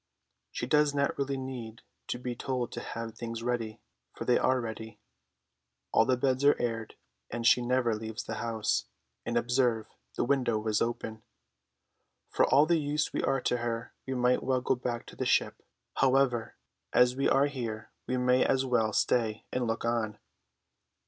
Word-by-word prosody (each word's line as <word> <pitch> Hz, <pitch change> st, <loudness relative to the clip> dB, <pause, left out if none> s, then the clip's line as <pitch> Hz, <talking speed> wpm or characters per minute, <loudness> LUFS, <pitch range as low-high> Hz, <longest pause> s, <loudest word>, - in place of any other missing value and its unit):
She -, -, -3 dB
does 150 Hz, +2 st, +3 dB
not 140 Hz, 0 st, +1 dB
really 140 Hz, 0 st, -1 dB
need 125 Hz, -4 st, -7 dB, 0.2 s
to -, -, -2 dB
be 125 Hz, 0 st, -4 dB
told 125 Hz, 0 st, -2 dB
to -, -, -5 dB
have 115 Hz, -1 st, -5 dB
things 115 Hz, 0 st, -6 dB
ready, 115 Hz, -3 st, -2 dB, 0.3 s
for -, -, -5 dB
they 125 Hz, -, +4 dB
are 130 Hz, 0 st, +2 dB
ready. 110 Hz, -2 st, -6 dB, 0.9 s
All 110 Hz, -, +4 dB
the 130 Hz, 0 st, +2 dB
beds 130 Hz, +1 st, +1 dB
are 145 Hz, -, +5 dB
aired, 115 Hz, -2 st, -3 dB, 0.3 s
and 120 Hz, -1 st, -4 dB
she 125 Hz, -, +6 dB
never 120 Hz, -1 st, +1 dB
leaves 110 Hz, 0 st, -5 dB
the 110 Hz, -, -5 dB
house, 115 Hz, -2 st, 0 dB, 0.4 s
and 120 Hz, 0 st, 0 dB
observe, 120 Hz, -2 st, +1 dB, 0.3 s
the -, -, 0 dB
window 120 Hz, -5 st, +1 dB
is 110 Hz, -1 st, +1 dB
open. 110 Hz, -2 st, -2 dB, 1.1 s
For -, -, +3 dB
all 145 Hz, +3 st, +5 dB
the 170 Hz, 0 st, +3 dB
use 150 Hz, 0 st, -1 dB
we -, -, 0 dB
are 135 Hz, -1 st, +1 dB
to 125 Hz, -, +1 dB
her, 115 Hz, -1 st, -3 dB
we 130 Hz, -, -2 dB
might 125 Hz, 0 st, +2 dB
well 130 Hz, -1 st, +1 dB
go 130 Hz, -, +2 dB
back 120 Hz, -1 st, -3 dB
to -, -, -12 dB
the -, -, -2 dB
ship. -, -, +1 dB, 0.4 s
However, 130 Hz, -3 st, +2 dB, 0.4 s
as 125 Hz, 0 st, +4 dB
we 135 Hz, -, +2 dB
are 135 Hz, +1 st, +4 dB
here 120 Hz, -6 st, -5 dB, 0.2 s
we 130 Hz, -, 0 dB
may 125 Hz, 0 st, +3 dB
as 135 Hz, 0 st, +2 dB
well 115 Hz, -4 st, +1 dB
stay 110 Hz, -1 st, +1 dB
and 125 Hz, -2 st, 0 dB
look 115 Hz, +1 st, -2 dB
on. 115 Hz, -3 st, -1 dB
120 Hz, 175 wpm, -30 LUFS, 115-130 Hz, 1.1 s, she